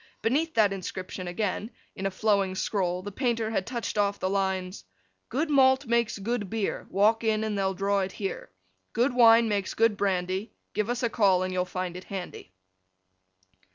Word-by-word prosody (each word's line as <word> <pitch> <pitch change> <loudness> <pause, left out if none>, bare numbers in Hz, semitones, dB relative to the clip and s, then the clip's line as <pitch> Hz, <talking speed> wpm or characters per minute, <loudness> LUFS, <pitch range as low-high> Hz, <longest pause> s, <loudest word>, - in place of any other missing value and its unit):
Beneath 305 +8 +1
that 210 -3 +4
inscription 185 -1 -6
again, 205 +3 -2 0.3
in 195 - -2
a - - 0
flowing 195 -1 +1
scroll, 185 -2 -1
the 205 - -6
painter 230 -1 -1
had 195 -4 -1
touched 235 -3 -3
off 200 0 +1
the 185 - -1
lines: 190 -1 -1 0.5
Good 290 +7 0
malt 265 0 +5
makes 235 -2 +1
good 205 0 -2
beer, 220 -1 -2
Walk 215 +4 +3
in, 220 -1 +1
and 215 -1 -2
they'll 195 -1 0
draw 200 +1 +1
it 190 -1 -2
here; 195 -2 -5 0.4
Good 245 +3 +2
wine 230 -1 +6
makes 205 -3 -1
good 225 -2 +3
brandy, 190 +1 -1 0.2
Give 215 +2 -1
us 245 +1 -2
a 235 - +2
call, 195 -5 +3
and 185 0 -3
you'll 180 0 0
find 180 -1 -4
it 180 - -8
handy. 185 - -7
205 Hz, 180 wpm, -27 LUFS, 190-230 Hz, 0.5 s, wine